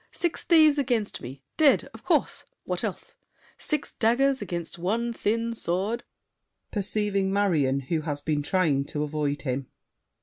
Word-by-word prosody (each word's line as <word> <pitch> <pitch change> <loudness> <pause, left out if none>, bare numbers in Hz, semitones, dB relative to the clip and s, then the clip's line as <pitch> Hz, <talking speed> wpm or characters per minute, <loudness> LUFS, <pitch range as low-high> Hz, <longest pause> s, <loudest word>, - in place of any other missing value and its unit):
Six 345 -2 -2
thieves 310 -4 +5
against 235 -6 -1
me! 135 +3 -9
Dead! 300 -4 +5
Of - - -12
course! - - +1 0.2
What - - -3
else? - - -5 0.4
Six 300 -2 -2
daggers 260 +4 +2
against 170 -3 -4
one 230 +7 0
thin 230 +1 0
sword— 205 +3 -1 0.7
[Perceiving 200 -1 0
Marion, 155 -10 +2
who 155 +4 -1
has 145 -2 -3
been 150 0 -1
trying 150 -4 +2
to 150 +1 -3
avoid 145 -2 -2
him. 130 -1 -2
195 Hz, 140 wpm, -27 LUFS, 150-235 Hz, 0.7 s, thieves